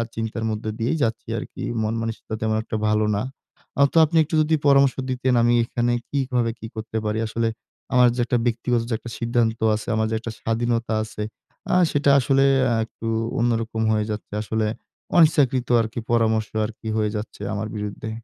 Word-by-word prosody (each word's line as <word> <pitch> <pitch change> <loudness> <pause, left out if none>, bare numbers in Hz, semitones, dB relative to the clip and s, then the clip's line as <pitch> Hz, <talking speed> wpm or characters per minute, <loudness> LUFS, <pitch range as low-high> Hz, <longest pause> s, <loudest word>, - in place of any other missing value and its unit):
চিন্তার 115 0 -3
মধ্যে 110 0 -3
দিয়েই 120 +8 0
যাচ্ছি 110 -1 -2
আরকি। - - -8 0.2
মন 110 +1 -1
মানসিকতা 115 -1 -4
তেমন 110 0 +1
একটা 110 - -5
ভালো 105 0 +2
না। 100 - 0 0.5
অ্যা 140 - +4
তো - - +1
আপনি 165 +2 0
একটু 160 +2 -3
যদি 155 +1 +2
পরামর্শ 140 -1 +5
দিতেন 130 0 0
আমি 120 0 +4
এখানে 120 0 0 0.2
কিভাবে 125 -4 0
কি 110 - -7
করতে 110 0 -4
পারি? 105 +1 -1
আসলে 115 +1 -1 0.5
আমার 125 0 +6
যে, - - -5
একটা 120 0 +1
ব্যক্তিগত 120 0 +1
যে, - - -1
একটা 120 +2 -9
সিদ্ধান্ত 115 -1 +1 0.2
আছে, 110 - -6
আমার 110 0 +1
যে, - - 0
একটা 115 0 -6
স্বাধীনতা 115 0 0
আছে, 105 -1 -6 0.4
এ্যা 180 - +3
সেটা 145 -1 +3
আসলে 135 +1 +3 0.2
এ্যা 120 -3 +2
একটু 115 0 -9 0.3
অন্যরকম 115 -1 0
হয়ে 105 -1 +1
যাচ্ছে। 105 -1 -6
আসলে 110 0 -1 0.5
অনিচ্ছাকৃত 145 -7 +4
আরকি 115 +2 -4
পরামর্শ 110 -2 +2 0.2
আরকি 110 +1 -8
হয়ে 105 -1 +1
যাচ্ছে 105 -1 -6
আমার 105 +1 -3
বিরুদ্ধে। 105 +1 -5
115 Hz, 180 wpm, -23 LUFS, 110-125 Hz, 0.5 s, আমার